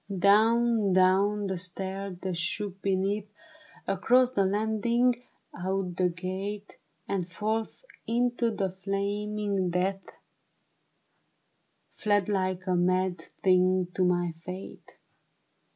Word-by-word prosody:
Down, 220 +2 +4
down 195 +3 +3
the 190 -2 -2
'stair 190 +1 -4
that 185 -2 -2
shook 190 +3 -3
beneath, 195 +2 0 0.6
Across 245 +6 +3
the 200 -7 +2
landing, 220 +5 +2 0.4
out 185 0 -2
the 180 -1 +3
gate, 190 +4 -5 0.3
And 185 -3 -2
forth 220 - -3 0.2
into 240 0 +1
the 195 -4 -2
flaming 200 -1 -1
death, 190 +2 0 1.9
Fled 205 -2 +1
like 185 -2 -1
a 185 - 0
mad 185 0 +1 0.2
thing 185 -1 +3
to 185 - +1
my 175 -1 +1
fate. 185 +1 -9
195 Hz, 105 wpm, -28 LUFS, 185-210 Hz, 1.9 s, Down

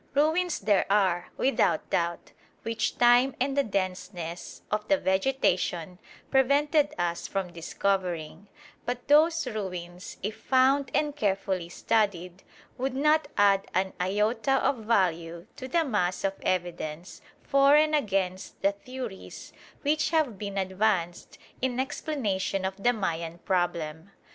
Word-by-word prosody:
Ruins 320 +4 +2
there 205 -3 +2
are, 185 -4 +2
without 265 -11 +1
doubt, 170 0 -1 0.3
which 225 +1 -2
time 245 +2 +5
and 270 +2 0
the 285 - +4
denseness 185 -4 -4
of 210 0 -1
the 295 - +4
vegetation 185 - 0 0.3
prevented 290 +3 +3
us 170 0 -2
from 190 -3 -3
discovering; 180 0 -2 0.4
but 245 0 -4
those 315 +2 +4
ruins, 180 -6 -6
if 210 +2 -2
found 265 +1 +3
and 295 -1 +1
carefully 190 -6 -1
studied, 185 -3 -1 0.4
would 260 0 -1
not 300 +2 +3
add 200 -1 +4
an 190 +1 +1
iota 215 +7 +1
of 275 - +1
value 170 -5 0
to 260 - -7
the 325 +5 +1
mass 185 -8 -1
of 195 0 +1
evidence 175 -2 -3 0.2
for 275 +1 +5
and 305 +1 +4
against 195 -9 -1
the 200 - +4
theories 235 0 -8 0.3
which 300 +1 +1
have 310 -8 +1
been 200 -1 -5
advanced 190 -2 -1 0.2
in 255 -1 -1
explanation 210 -9 -2
of 190 0 -2
the 240 - +4
Mayan 170 -6 -3
problem. 170 -2 -2
200 Hz, 130 wpm, -27 LUFS, 180-265 Hz, 0.4 s, time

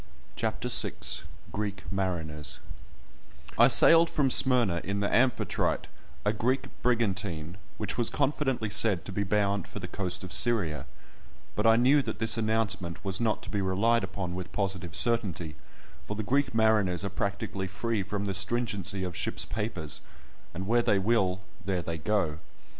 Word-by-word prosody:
CHAPTER 110 +2 -2
VI—GREEK 100 -4 +1
MARINERS 80 -6 -3 1.0
I - - +6
sailed 165 0 +7
from 135 -3 +1
Smyrna 120 -12 +4
in 100 +1 -3
the 100 - -1
Amphitrite, 125 0 +1 0.4
a 105 - +2
Greek 125 +5 -1
brigantine, 100 -8 -1 0.2
which 105 +3 -2
was 120 - +2
confidently 135 -6 -1
said 100 -3 +3
to - - -6
be 100 - -2
bound 100 -1 0
for - - -10
the 95 -3 -5
coast 90 +1 -3
of 95 - -7
Syria; 100 -11 +1 0.7
but 105 +2 +1
I 115 - +6
knew 130 +5 +4
that - - -5
this 110 -1 +2
announcement 110 -6 -2
was 95 +3 0
not 110 -2 0
to - - -8
be 100 - -1
relied 105 +5 +2
upon 95 -2 -4
with 90 0 -6
positive 95 -5 -2
certainty, 100 -10 +1 0.5
for 105 - -4
the 110 - -3
Greek 140 +2 0
mariners 105 -5 +2
are 100 - -2
practically 100 0 -3
free 110 +3 -2
from 100 +1 -4
the 100 - -2
stringency 100 -2 -1
of 90 -2 -4
ship's - - -2
papers, 105 -9 -4 0.5
and 90 +2 -6
where 120 +4 +3
they 105 - +2
will, 95 -2 +1 0.2
there 95 -3 -2
they 80 +1 -4
go. 85 -5 -1
100 Hz, 160 wpm, -28 LUFS, 95-115 Hz, 1.0 s, sailed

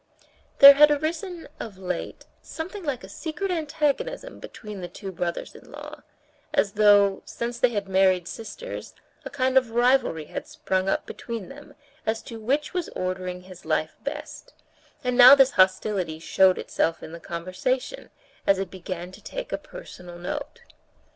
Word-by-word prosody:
There 280 0 +12
had 295 +2 +7
arisen 330 +4 -2
of 210 -4 -7
late 180 -2 -5 0.2
something 370 +5 -7
like 280 -8 -3
a - - -9
secret 325 - -4
antagonism 320 - -2
between 210 -3 -9
the 175 - -5
two 195 +2 -8
brothers 170 -1 -4
in - - -15
law; - - -9 0.5
as 200 - +2
though, 205 -2 +5
since 235 0 -5
they 250 - +4
had 205 -4 -3
married 190 -2 +3
sisters, 230 - -8 0.3
a - - -4
kind 260 -1 +3
of 250 -3 -10
rivalry 240 - +2
had - - -6
sprung 195 -12 -1
up - - 0
between 230 -5 -7
them 290 +1 -13 0.3
as 220 +1 -2
to 230 -2 -9
which 275 +7 -1
was 360 -2 -2
ordering 185 0 -3
his 185 -1 -13
life 155 0 -1
best, 295 +2 -7 0.5
and 250 -1 0
now 250 +2 +10
this 270 -1 +5
hostility 185 - +2
showed 185 +3 +3
itself 165 0 -1
in - - -8
the 170 - -8
conversation, 185 - -3 0.4
as 195 - +5
it 190 -1 -4
began 180 -1 -6
to - - -14
take - - -6
a - - +1
personal 180 - -11
note. 175 +1 -6
220 Hz, 160 wpm, -25 LUFS, 185-285 Hz, 0.5 s, There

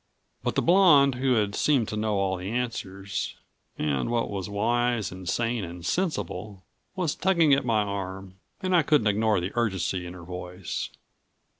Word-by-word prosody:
But - - -2
the - - +2
blonde 165 -7 +6
who 125 -4 +2
seemed 125 +1 +2
to - - -3
know 105 0 0
all 95 -1 +1
the 90 +2 -5
answers 100 -5 -3 0.4
and 75 - 0
what 120 -2 0
was 95 -1 -4
wise 115 0 0
and 90 -1 -6
sane 115 -2 0
and 85 -1 -8
sensible 105 - -2 0.3
was 180 -6 0
tugging 170 -6 +3
at 135 -1 +2
my 110 -3 +2
arm 95 -1 -6 0.2
and 185 -1 +2
I 170 - +6
couldn't 150 -6 +3
ignore 105 -1 +2
the 90 +3 -3
urgency 95 -5 -1
in 90 - -8
her 90 - -10
voice. 90 +1 -5
105 Hz, 165 wpm, -27 LUFS, 95-125 Hz, 0.4 s, blonde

